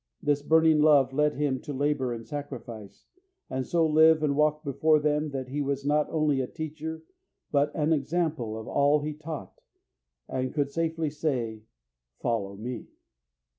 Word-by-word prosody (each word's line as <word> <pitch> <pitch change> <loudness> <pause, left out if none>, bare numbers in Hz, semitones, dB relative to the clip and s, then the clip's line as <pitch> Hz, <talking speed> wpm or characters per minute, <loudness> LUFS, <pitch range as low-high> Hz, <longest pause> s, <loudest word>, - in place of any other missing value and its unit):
This 145 -1 +1
burning 160 +1 +4
love 145 -3 +5
led 150 +1 +2
him 140 -2 0
to 150 - -7
labour 140 -2 0
and 115 -1 -6
sacrifice, 120 -6 -8 0.5
and 130 -1 -2
so 170 -1 +2
live 155 0 +5
and 145 -2 +1
walk 150 +1 +2
before 155 +2 +3
them 150 +1 0
that 130 -2 -5
he 145 +2 -2
was 140 0 -2
not 150 +1 +2
only 150 -4 +1
a 130 - -3
teacher, 160 +1 -6 0.5
but 145 0 +2
an 155 +1 +2
example 150 -6 -1
of 110 - -9
all 145 +1 +3
he 150 +1 -3
taught, 150 - -8 0.7
and 130 +1 -3
could 140 -2 0
safely 165 -1 -1
say, 125 -8 -2 0.5
"Follow 100 -5 -2
me." 115 +2 -6
145 Hz, 160 wpm, -27 LUFS, 130-155 Hz, 0.7 s, love